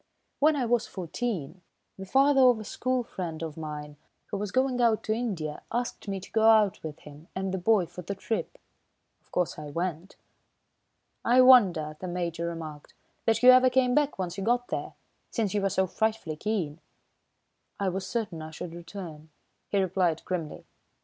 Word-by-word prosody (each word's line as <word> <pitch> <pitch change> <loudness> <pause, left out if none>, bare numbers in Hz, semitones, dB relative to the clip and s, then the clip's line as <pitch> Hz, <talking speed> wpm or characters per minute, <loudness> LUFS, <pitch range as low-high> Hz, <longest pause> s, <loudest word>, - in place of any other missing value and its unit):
When 305 +2 +4
I 265 -4 0
was 235 0 +1
fourteen, 180 - -4 0.3
the 190 0 -9
father 270 +4 +4
of 250 -3 +6
a - - -6
school 255 +4 -1
friend 170 -8 -5
of 160 -2 -5
mine, 150 -2 -7 0.3
who 205 - -1
was 210 0 -3
going 260 -1 +1
out 230 -2 +3
to 215 - 0
India, 190 -11 -3
asked 240 -2 -3
me 195 -1 -2
to - - -12
go 220 0 +5
out 215 -4 +4
with 155 -2 -6
him 150 +2 -13
and 190 0 -2
the 190 - -1
boy 200 0 +3
for 175 +2 -9
the 200 +3 -5
trip. 220 +3 -3 0.6
Of - - -35
course, 180 -3 -1
I 150 -1 -7
went." 170 +3 -4 1.1
"I 250 +2 +5
wonder," 185 -12 +6
the 185 - -5
Major 170 -1 -2
remarked, 160 -3 -7 0.3
"that 225 +1 +2
you 255 - +11
ever 255 0 +6
came 250 -1 +2
back 295 +1 +2
once 185 0 -3
you - - -3
got 245 +2 +1
there, - - -3 0.4
since 215 -5 -1
you 205 - +1
were 195 - +1
so 190 0 +1
frightfully 220 -4 -1
keen." 170 -5 -2 1.0
"I 200 -1 +1
was 185 +1 -4
certain 210 -9 -3
I 155 - -7
should 165 +2 -7
return," 165 -3 -9 0.4
he 200 - 0
replied 180 -3 +1
grimly. 170 -4 -4
190 Hz, 185 wpm, -28 LUFS, 165-230 Hz, 1.1 s, you